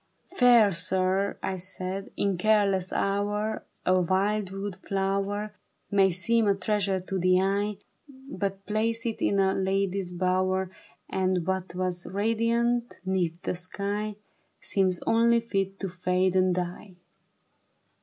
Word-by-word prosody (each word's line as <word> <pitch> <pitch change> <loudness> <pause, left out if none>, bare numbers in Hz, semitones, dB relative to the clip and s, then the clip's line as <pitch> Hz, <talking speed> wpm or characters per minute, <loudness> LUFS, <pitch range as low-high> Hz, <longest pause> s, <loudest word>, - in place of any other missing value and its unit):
" - - -22
Fair 240 -5 +7
sir," 190 +3 0
I 190 - -2
said, 185 +1 -5
" - - -37
in 200 -1 +1
careless 195 -1 +2
hour 205 +2 -1 0.2
A 185 0 +4
wild 195 +3 +1
wood 195 0 -5
flower 195 +2 -2 0.4
May 195 -1 +5
seem 220 +5 +1
a 200 - +4
treasure 195 -1 0
to 190 +1 -4
the 185 +1 +4
eye, 200 +2 0 0.3
But 210 -8 -5
place 225 +3 -1
it 225 -2 -3
in 200 - +2
a 190 -1 +3
lady's 195 -1 -1
bower, 185 +1 0 0.4
And 185 -2 0
what 190 -1 -2
was 180 -1 -2
radiant 230 +4 0
'neath 180 -3 0
the - - -1
sky 200 +3 -3 0.4
Seems 185 -3 0
only 235 +1 +4
fit 195 -4 -2
to 195 - -2
fade 180 +1 0
and 185 -1 +3
die." 180 +1 -5
195 Hz, 135 wpm, -27 LUFS, 185-210 Hz, 0.4 s, Fair